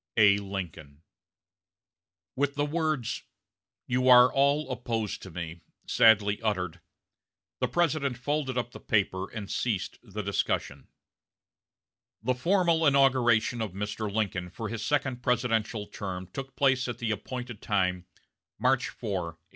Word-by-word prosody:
"A. 100 -2 +6
LINCOLN." 85 -7 -7 1.3
With 140 +1 0
the 145 0 +1
words, 155 -5 -1 0.6
"You 125 +1 +1
are 125 0 +8
all 140 +2 +2
opposed 115 -4 -3
to 95 - -9
me," 85 -1 -6 0.2
sadly 105 -2 +4
uttered, 90 -6 -2 0.8
the - - +1
President 155 -7 0
folded 130 0 -2
up 120 -1 -2
the - - -10
paper 95 -3 0
and 105 -3 -6
ceased 105 -4 -2
the 105 -2 -6
discussion. 100 0 -2 1.4
The 130 +2 +2
formal 170 +3 +2
inauguration 125 -4 +3
of 105 -5 -3
Mr. 105 +1 -3
Lincoln 100 -4 -1
for 110 +4 -6
his 115 -2 -4
second 135 -3 0
presidential 115 -3 0
term 95 -3 -6
took 135 +6 -8
place 130 -1 +2
at 120 -2 -4
the 115 -2 -2
appointed 120 +2 -5
time, 90 -3 0 0.5
March 130 0 +2
4, 90 -7 -4
1865. 85 - -47
115 Hz, 130 wpm, -28 LUFS, 100-130 Hz, 1.4 s, are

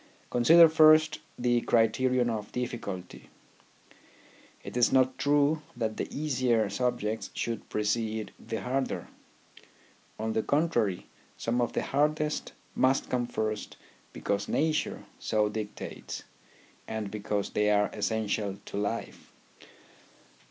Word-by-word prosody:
Consider 165 +8 +7
first 155 -1 +5 0.2
the 120 -1 +2
criterion 120 +2 +2
of 105 -2 -4
difficulty. 100 -7 -5 1.3
It - - -8
is 120 -1 +4
not 130 0 +3
true 145 +2 +3 0.2
that 110 -2 -2
the - - -2
easier 125 -8 +1
subjects 115 -1 -1
should 115 -1 -3
precede 110 0 -1
the 110 -2 -5
harder. 130 +4 -2 1.1
On 110 0 -2
the 110 - +1
contrary, 120 - +1 0.3
some 120 +2 0
of 120 - -1
the - - 0
hardest 150 +2 0 0.2
must 130 +1 +2
come 120 -1 0
first 110 -3 -3 0.3
because 100 0 -2
nature 155 0 0 0.2
so 105 -1 +1
dictates, 105 -1 -6 0.6
and 110 -3 -4
because 105 -1 -2
they 105 0 +2
are 105 0 +3
essential 105 -2 -1
to - - -6
life. 105 +3 -4
115 Hz, 115 wpm, -29 LUFS, 105-135 Hz, 1.3 s, Consider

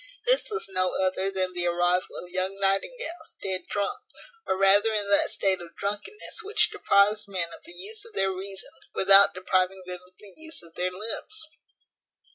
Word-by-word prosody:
This - - +2
was 425 0 -2
no 185 -1 0
other 190 +1 0
than 185 -1 -1
the 175 0 0
arrival 175 +1 +1
of 180 - -12
young 190 +2 -2
Nightingale, 320 - -1
dead 185 -2 -3
drunk; 200 -1 -2 0.5
or 190 - 0
rather 200 +3 +5
in 205 -2 -1
that 200 - +5
state 190 -2 +1
of 170 -1 -12
drunkenness 210 - -4
which 425 0 +2
deprives 205 +1 +2
men 180 -4 -2
of - - -12
the 345 - -9
use 420 +3 -4
of 460 -2 -13
their 195 0 +1
reason 190 +1 -4 0.2
without 195 0 +7
depriving 185 0 0
them 180 0 -4
of 185 0 -23
the 205 -2 -13
use 315 - -3
of 165 -1 -12
their 180 +2 +1
limbs. 225 - -4
195 Hz, 180 wpm, -26 LUFS, 185-215 Hz, 0.5 s, without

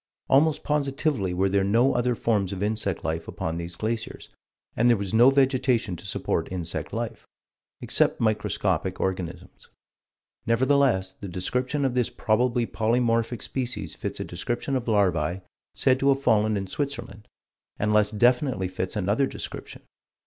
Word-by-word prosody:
Almost 150 +3 +3
positively 140 - 0
were 95 +2 +1
there 100 0 +2
no 115 +7 +3
other 120 0 +1
forms 105 -5 0
of 100 0 -3
insect 105 -3 -1
life 80 +1 -3
upon 80 +1 -4
these 85 0 -5
glaciers, 110 +3 -4 0.5
and 120 +2 +3
there 120 - +5
was 100 +1 -3
no 120 +4 +7
vegetation 130 -6 +2
to - - -9
support - - -2
insect 85 -2 -4
life, 115 -1 -5 0.5
except - - +2
microscopic 110 -2 0
organisms. 90 -1 -4 0.8
Nevertheless 120 -5 +2
the 100 - -9
description 125 - -2
of 130 - 0
this 125 -2 +1
probably 120 +1 +1
polymorphic 115 0 0
species 125 -2 -4
fits - - -5
a - - -2
description 125 +3 -3
of 125 -2 -2
larvae 95 -5 +1 0.3
said 130 -1 +3
to 140 - +3
have 135 0 +3
fallen 110 -5 +2
in 95 - -3
Switzerland, 120 -3 -5 0.5
and 105 0 0
less 105 -1 +4
definitely 120 -2 +2
fits 95 0 -4
another 105 +7 +1
description. - - -8
110 Hz, 150 wpm, -25 LUFS, 95-125 Hz, 0.8 s, no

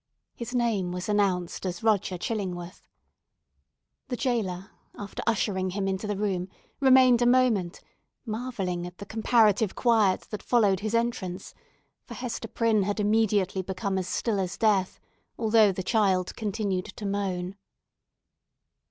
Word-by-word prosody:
His 245 +1 -6
name 220 -7 0
was 180 0 -4
announced 195 -4 0
as 180 +1 -4
Roger 200 -4 +1
Chillingworth. 180 -3 -5 1.2
The 250 - -2
jailer, 195 -8 -2 0.3
after 205 -1 -6
ushering 190 -4 0
him 195 +1 -2
into 195 +2 -2
the 205 -1 -2
room, 190 -3 -1 0.3
remained 260 -2 +6
a 240 - +4
moment, 240 -8 +2 0.4
marvelling 215 -7 -3
at 180 0 -12
the 200 - -8
comparative 220 -1 +2
quiet 220 -6 +3
that 210 - -5
followed 205 -6 +3
his 215 +2 -2
entrance; 195 -6 -2 0.5
for - - -10
Hester 240 -2 -5
Prynne 225 -1 +1
had 205 +2 -1
immediately 205 -3 +2
become 190 +1 -2
as 185 - -4
still 210 +1 -1
as 190 0 -3
death, 200 -4 +1 0.4
although 220 -2 +4
the 185 0 -4
child 190 -3 +1
continued 200 -4 -2
to 210 +1 -8
moan. 195 -2 -2
205 Hz, 135 wpm, -27 LUFS, 185-225 Hz, 1.2 s, remained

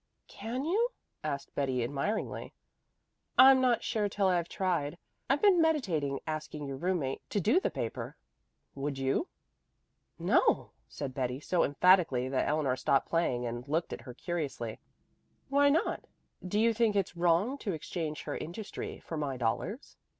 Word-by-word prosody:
"Can 250 +5 -4
you?" 435 +9 +2 0.3
asked 140 -2 -4
Betty 130 -3 0
admiringly. 145 - -2 0.8
"I'm 265 0 +9
not 250 -2 +3
sure 210 -2 0
till 200 0 0
I've 175 -2 +1
tried. 170 -5 -1 0.3
I've 275 +7 +2
been 385 -5 +6
meditating 175 - +1
asking 155 -1 -4
your 135 -1 -5
roommate 165 -5 -1
to 205 - 0
do 225 - +4
the - - 0
paper. - - -5 0.6
Would 140 0 -3
you?" 135 - 0 0.9
"No," - - +2 0.2
said 140 -3 -5
Betty 125 0 -2
so 170 +3 +1
emphatically 145 -5 +4
that 135 - 0
Eleanor 145 -3 +1
stopped 130 +1 +1
playing 130 -8 +1
and 120 +2 -5
looked 160 +4 -1
at - - -6
her 125 0 -10
curiously. 140 -9 -4 0.7
"Why 285 +1 +5
not? 315 +4 +1 0.4
Do 190 +3 -1
you 230 +1 +4
think 225 -2 +2
it's 195 -3 0
wrong 175 +10 +2
to 200 -7 -2
exchange 155 -1 -4
her - - -4
industry 195 +6 -6
for 160 - -6
my 140 -3 -2
dollars?" 125 - -3
165 Hz, 150 wpm, -31 LUFS, 140-215 Hz, 0.9 s, I'm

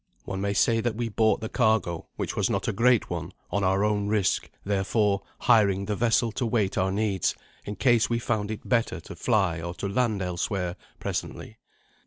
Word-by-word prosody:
One 95 0 -4
may 100 0 0
say 115 +3 +3
that 115 -1 -1
we 115 0 -2
bought 110 0 +2
the 110 - -3
cargo, 110 -8 +1
which - - -3
was - - +1
not - - -1
a - - 0
great 120 0 +3
one, 85 +1 -4 0.2
on 100 - 0
our 95 +2 +2
own 105 -1 0
risk, 105 -3 +1 0.2
therefore, 100 0 +1 0.2
hiring 100 -3 +4
the 105 +1 -1
vessel 115 +1 +2
to 120 - -2
wait 110 -4 0
our 95 +1 +1
needs, 100 -3 0 0.3
in 105 - -5
case 120 -1 +3
we 115 - +1
found 110 -3 -1
it 110 - -6
better 115 -2 +1
to - - -10
fly 95 -8 +1
or 85 +1 -5
to 100 - -3
land 105 -1 0
elsewhere 90 0 -2 0.2
presently. - - -5
105 Hz, 195 wpm, -26 LUFS, 95-115 Hz, 0.3 s, hiring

